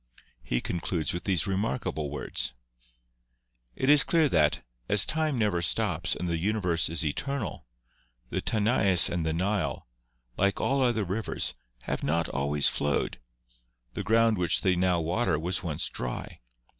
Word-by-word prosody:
He - - -1
concludes 85 -4 -2
with 85 - -5
these 90 -6 +1
remarkable 95 - -2
words: 70 -3 -3 1.2
"It 130 - -2
is 145 0 +7
clear 165 -3 +3
that, 75 - +2 0.2
as 105 -2 +4
time 155 -3 +1
never 105 -6 +1
stops 80 - +1
and 90 - -4
the 85 -1 -1
uni 105 +5 0
verse 85 -6 +1
is 85 0 -1
eternal, 120 - -3 0.6
the - - -2
Tanais 105 -5 +3
and 85 -2 -1
the 80 - 0
Nile, 95 +5 -1 0.5
like 100 0 +1
all 135 0 +1
other 120 -4 +2
rivers, 100 +4 -1 0.3
have - - -3
not 85 +1 0
always 70 +1 +1
flowed; 70 0 -1 0.7
the - - -3
ground 110 +1 +3
which 85 -1 +2
they 95 -2 +2
now 90 -1 +2
water 85 +1 0
was 90 +3 -2
once 80 -5 -1
dry. 60 -1 -5
90 Hz, 150 wpm, -28 LUFS, 80-110 Hz, 1.2 s, is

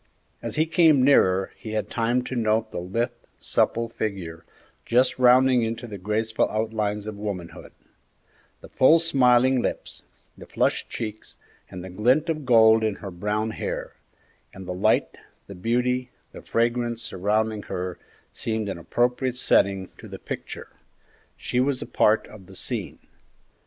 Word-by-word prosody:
As - - -4
he 155 - +2
came 160 -4 +4
nearer, 95 -9 +4
he 110 -3 -8
had 110 -1 -1
time 120 +2 0
to 130 - -5
note 110 -1 +1
the - - -4
lithe, 100 +7 -2 0.3
supple 115 0 0
figure, 95 -8 -5 0.4
just 125 +2 +2
rounding 125 0 +5
into 115 +2 -3
the 105 -4 -8
graceful 110 +3 0
outlines 110 -1 -2
of 110 -1 -6
womanhood; 100 -5 -6 0.9
the - - -11
full, 155 +6 +5
smiling 130 -5 +3
lips, - - -4 0.3
the - - -13
flushed - - 0
cheeks, 110 -1 -6 0.3
and 90 -1 -8
the 95 - -8
glint 125 - +2
of 155 -4 -3
gold 110 -2 +6
in 110 -2 0
her 100 -1 -8
brown 105 +5 -2
hair; - - -5 0.6
and 95 -1 -9
the 90 - -3
light, 90 - +1 0.3
the 100 - -10
beauty, 125 +6 0 0.2
the - - -11
fragrance 120 0 -1
surrounding 105 +3 -1
her 90 0 -5 0.3
seemed 110 -2 -2
an 90 - -5
appropriate 125 +6 0
setting 95 -6 +2
to - - -10
the - - -8
picture. - - -7 0.7
She 125 - -2
was 130 0 +1
a - - -5
part 110 +1 +2
of 100 -4 -14
the - - -13
scene. - - -4
110 Hz, 150 wpm, -24 LUFS, 100-125 Hz, 0.9 s, gold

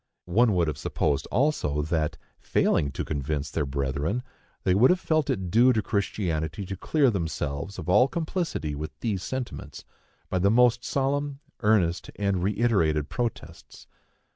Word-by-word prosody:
One 105 +4 +3
would 85 -2 +2
have 75 -2 -3
supposed 70 +1 -1
also, 120 - +1
that, 80 -1 -1 0.2
failing 70 - +1
to - - -3
convince 70 -1 -3
their 75 -3 -1
brethren, 70 - -1 0.4
they 90 - +3
would 110 +7 +5
have 180 - +3
felt 155 -5 0
it 95 -3 -1
due 120 +4 +6
to 110 - +1
Christianity 95 -5 -2
to 95 - -5
clear 140 - +2
themselves 80 -2 -3
from - - -6
all 105 +8 +5
complicity 160 - -2
with 75 +2 -6
these 105 -6 -1
sentiments, 130 +5 -6 0.4
by 95 - -1
the 100 +3 +3
most 120 +2 +4
solemn, 140 +1 -1 0.2
earnest 100 -6 +2
and 100 -3 0
reiterated 95 -7 +1
protests. 120 -3 -5
95 Hz, 150 wpm, -26 LUFS, 80-120 Hz, 0.4 s, due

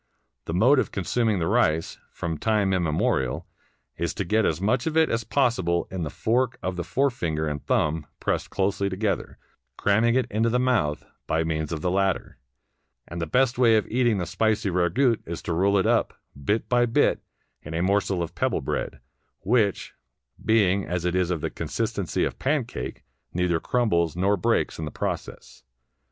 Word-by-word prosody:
The 80 - -3
mode 125 +9 +5
of - - -1
consuming 110 +3 0
the 85 - 0
rice, 85 -6 +1
from 80 -2 -4
time 105 -3 +1
immemorial, 75 -7 0 0.5
is - - -2
to - - -2
get 110 +4 +2
as 80 - -1
much 120 - +1
of 160 0 -1
it 160 -1 +4
as 115 0 0
possible 95 -10 +1
in 95 -1 -4
the 80 - -2
fork 125 - 0
of 95 0 -2
the 90 - -3
forefinger 85 - 0
and 75 -2 -4
thumb 75 0 0
pressed - - -1
closely 100 0 0
together, 100 +1 -2 0.4
cramming 110 +4 +3
it 130 - +2
into 110 +3 +1
the 120 - +1
mouth 120 -13 +1 0.2
by 80 +1 +1
means 80 -1 -2
of 80 -2 -3
the 90 - 0
latter; 95 0 -1 0.7
and 85 +1 -6
the 80 - -2
best 125 +5 +2
way 115 -3 +6
of 110 - +2
eating 120 -3 +2
the 90 - -2
spicy 110 +2 0
ragout 90 +8 +2
is 85 0 -5
to 85 - -2
roll 100 +4 +3
it 95 - +2
up, - - +1 0.3
bit 110 +2 0
by 120 -1 +3
bit, 115 - +2 0.4
in 80 +2 -7
a 85 - 0
morsel 95 -2 +1
of 85 +1 -6
pebble 130 +1 0
bread, 65 - -3 0.4
which, 105 -2 +1 0.5
being 100 -3 +3
as 90 -1 -3
it 90 - +1
is 90 -1 +1
of 85 -4 -1
the 80 - -2
consistency - - -2
of - - -3
pancake, 135 -3 -2 0.3
neither 90 -2 +1
crumbles 85 -11 +1
nor 95 +3 +2
breaks 90 - 0
in 80 - -3
the - - -4
process. - - -5
95 Hz, 180 wpm, -25 LUFS, 85-115 Hz, 0.7 s, way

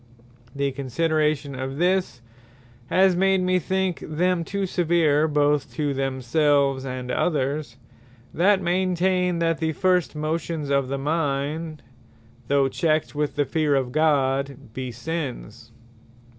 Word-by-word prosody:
The 140 0 0
consideration 150 +2 -1
of 130 +1 -5
this, 180 -7 0 0.6
has 190 0 +4
made 190 +1 +3
me 185 0 +2
think 190 +1 -1
them 170 +3 0
too 200 +3 -2
severe, 165 -4 +2
both 145 -1 +1
to 145 -2 -1
themselves, 135 +1 +1
and 125 -1 -5
others, 140 -5 -1 0.6
that 190 +2 +3
maintain, 180 0 +1
that 165 -1 0
the 160 -1 -1
First 180 -1 +1
motions 155 -1 -3
of 140 -1 +2
the 140 +1 -2
mind, 150 +1 -2 0.6
(though 140 0 +3
checked 155 +2 0
with 150 0 -2
the 145 - +1
fear 150 -1 +1
of 130 -2 -1
God) 140 -4 0
be 130 -1 -5
Sinnes. 120 -4 -6
150 Hz, 125 wpm, -24 LUFS, 135-170 Hz, 0.6 s, has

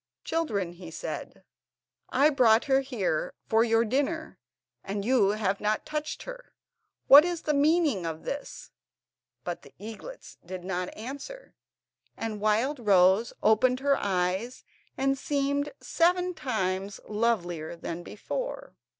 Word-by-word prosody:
"Children," 215 - -1
he 175 -1 -10
said, 165 - -6 0.7
"I 285 +4 +4
brought 240 -4 +4
her 270 -2 +4
here 215 - -2
for 225 +1 +3
your 230 0 +3
dinner, 290 +7 -1 0.4
and 200 0 -4
you 245 -5 +4
have 200 -2 -1
not 215 +1 0
touched 305 0 -4
her; - - -10 0.5
what 285 +2 +10
is 350 -1 -3
the 300 - +1
meaning 290 - +2
of 160 -1 -5
this?" 285 0 -6 0.7
But - - -4
the - - -17
eaglets 225 - -10
did 180 0 -7
not 180 -1 -3
answer, 280 - -8 0.6
and 215 -2 -4
Wildrose 215 -3 +3
opened 250 +4 +4
her 280 0 +3
eyes, 190 +5 -1 0.3
and 270 0 +2
seemed 285 0 0
seven 360 +2 +2
times 200 - -2
lovelier 175 -8 -1
than 170 0 -6
before. - - -5
230 Hz, 125 wpm, -28 LUFS, 195-285 Hz, 0.7 s, what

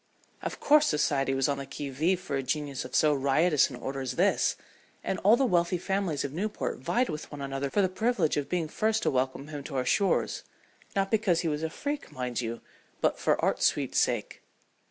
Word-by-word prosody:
Of - - -5
course 300 +1 +5
society 135 -3 +1
was 135 -1 +2
on 140 -1 -1
the 135 - -6
qui 140 +1 -5
vive 165 +7 +1
for 180 -6 -4
a 135 - 0
genius 140 0 -2
of - - -7
so 150 -1 +4
riotous 145 +3 +3
an 130 - -7
order 135 +2 -5
as 130 - -3
this, - - +2 0.5
and 190 - -2
all 215 +5 +5
the 270 - +2
wealthy 175 -4 +2
families 185 -5 -1
of 140 - -5
Newport 205 +6 -3
vied 245 +2 +1
with 155 -2 -6
one 145 - -7
another 135 0 -3
for 200 +7 +2
the - - +4
privilege 190 -3 0
of 145 -1 -2
being 175 -3 0
first 220 +6 0
to - - +2
welcome 130 +2 -1
him 145 -2 -6
to 140 - -6
our 130 -1 0
shores, 200 -2 +1 0.5
not 195 0 0
because 205 -6 +2
he 170 - -2
was 150 -1 -1
a 160 - -1
freak, 285 - -4
mind 125 -1 -3
you, 115 0 -4 0.4
but - - +1
"for - - +2
art's - - +3
sweet - - -1
sake." - - 0
155 Hz, 215 wpm, -28 LUFS, 135-190 Hz, 0.5 s, course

